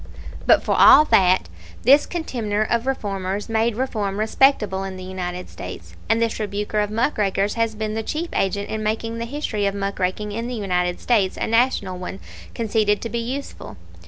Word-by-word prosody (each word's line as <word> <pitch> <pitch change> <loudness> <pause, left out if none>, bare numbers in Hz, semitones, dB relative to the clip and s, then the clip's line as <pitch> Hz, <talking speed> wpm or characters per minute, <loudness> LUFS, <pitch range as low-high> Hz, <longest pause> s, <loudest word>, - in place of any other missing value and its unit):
"But - - +5
for - - 0
all 305 - +8
that, 185 - +4 0.4
this 280 +5 +5
contemner 230 -11 -2
of 235 +3 -1
'reformers' 200 -5 -2
made 225 0 +1
reform 215 -6 -2
respectable 215 -3 +2
in 190 -1 -6
the 185 - -8
United 180 -1 -5
States, - - -9
and 225 0 +3
this 230 -1 0
rebuker 210 0 -2
of 210 -1 0
'muck 230 +4 0
rakers' 200 0 +1
has 230 -1 -1
been 215 0 -3
the 225 - -2
chief 315 +9 -3
agent 200 +1 -1
in 220 - -3
making 225 +2 -2
the 230 - -3
history 230 -6 -2
of 200 - -2
'muck 200 0 -3
raking' 190 +3 -1
in 230 +3 -4
the 250 - -4
United 180 -4 -1
States 205 -6 +1
a - - -1
National 225 -6 +1
one, 185 +1 -6 0.4
conceded 215 -2 +1
to 230 - -3
be 235 - -2
useful. 255 - -6
215 Hz, 190 wpm, -22 LUFS, 195-230 Hz, 0.4 s, all